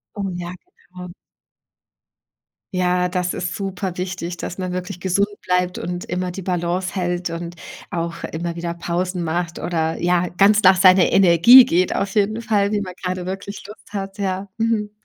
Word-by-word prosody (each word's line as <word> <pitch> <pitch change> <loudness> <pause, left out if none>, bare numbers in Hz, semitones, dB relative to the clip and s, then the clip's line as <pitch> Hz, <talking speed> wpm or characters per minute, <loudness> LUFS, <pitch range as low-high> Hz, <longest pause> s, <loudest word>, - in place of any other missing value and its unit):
Oh, 200 -2 -3
ja, 175 0 -5 0.4
genau. 180 0 -9 1.6
Ja, 180 0 +1
das 180 -1 -1
ist 175 -1 -4
superwichtig, 185 -2 -4
dass 180 - -6
man 185 -1 -3
wirklich 180 -1 -5
gesund 190 +2 +1
bleibt 180 0 0
und 175 0 -4
immer 180 +1 -3
die 180 +2 -7
Balance 180 +1 -2
hält 175 -2 -2
und 170 +1 -6 0.3
auch 170 -1 -4
immer 170 +1 -4
wieder 170 0 -4
Pausen 175 +1 -2
macht 170 +1 -2
oder 160 -2 -1
ja, 175 0 +1
ganz 200 +4 +4
nach 190 -1 +7
seiner 185 -1 +6
Energie 195 +8 +8
geht 180 +2 +1
auf 195 -1 -2
jeden 215 +2 0
Fall, 205 -3 +1
wie 210 -1 0
man 185 -3 -6
grade 180 -1 -3
wirklich 195 +2 -6
Lust 210 0 -13
hat, 195 0 -5
ja. 190 0 -2
Mhm. 225 -2 0
180 Hz, 165 wpm, -21 LUFS, 175-195 Hz, 1.6 s, Energie